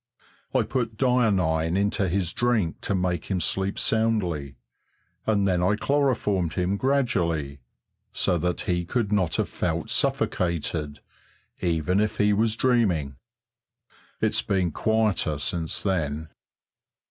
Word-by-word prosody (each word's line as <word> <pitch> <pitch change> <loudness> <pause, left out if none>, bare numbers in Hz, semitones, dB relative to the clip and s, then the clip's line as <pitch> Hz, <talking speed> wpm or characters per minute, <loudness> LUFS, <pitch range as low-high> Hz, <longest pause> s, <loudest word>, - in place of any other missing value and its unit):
"I - - +4
put 115 -4 -2
dionine 95 -10 +2
into 100 -1 +1
his 90 -1 -1
drink 115 -9 0
to 100 - -1
make 90 -3 -1
him 95 -2 -1
sleep 95 +2 0
soundly, 90 -11 0 0.7
and 100 -3 +2
then 90 -2 +1
I 95 +4 +3
chloroformed 110 - 0
him 90 +1 0
gradually, 90 - 0 0.5
so 90 - +1
that 90 +2 -1
he 90 -1 -1
could 105 +3 -1
not 95 -6 +1
have - - 0
felt - - -2
suffocated 80 -3 -1 0.6
even 85 +2 +1
if 105 +1 0
he 105 0 +3
was 110 +1 +1
dreaming. 95 - +1 1.0
It's - - +1
been 95 -3 0
quieter 110 -7 +1
since 80 +4 -1
then." 80 -5 -1
95 Hz, 125 wpm, -25 LUFS, 85-110 Hz, 1.0 s, I